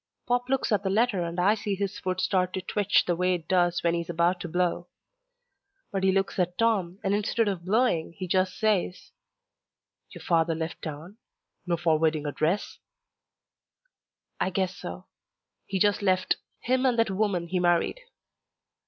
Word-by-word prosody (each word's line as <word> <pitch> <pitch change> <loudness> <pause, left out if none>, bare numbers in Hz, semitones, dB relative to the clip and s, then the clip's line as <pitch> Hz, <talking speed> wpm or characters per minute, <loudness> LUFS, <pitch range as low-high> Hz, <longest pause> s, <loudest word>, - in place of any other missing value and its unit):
Pop 245 +1 0
looks 270 -2 0
at 210 - +3
the 190 - -1
letter 210 -1 +2
and 170 +1 -4
I 195 +4 +4
see 205 -2 -2
his 200 0 -3
foot 185 -1 -2
start 185 -1 +1
to 190 - -2
twitch 205 +1 +2
the 175 - +1
way 180 +1 +1
it 165 -2 -8
does 175 -1 +2
when 170 -1 +2
he's 170 0 -3
about 175 +2 +1
to 175 - -5
blow. 175 0 -1 1.0
But 195 -1 -2
he 190 - +4
looks 195 0 0
at 180 0 0
Tom, 200 -6 +1
and 195 -1 +1
instead 210 +2 +1
of 190 -4 -2
blowing 190 -6 +1
he 185 - -4
just 185 +1 +1
says, 205 -4 0 1.0
"Your - - -11
father 165 -2 +2
left 160 +1 -5
town? 160 +6 -7 0.5
No 170 -1 +1
forwarding 160 -2 +1
address?" 160 +7 -1 1.6
"I - - +1
guess 190 0 -1
so. 85 +1 -8 0.6
He 195 - -2
just 205 +2 +2
left. 185 -2 +2 0.2
Him 255 +1 +1
and 250 -3 +2
that 230 -3 +2
woman 190 -4 -1
he 180 0 0
married." 175 - +2
185 Hz, 170 wpm, -27 LUFS, 170-205 Hz, 1.6 s, I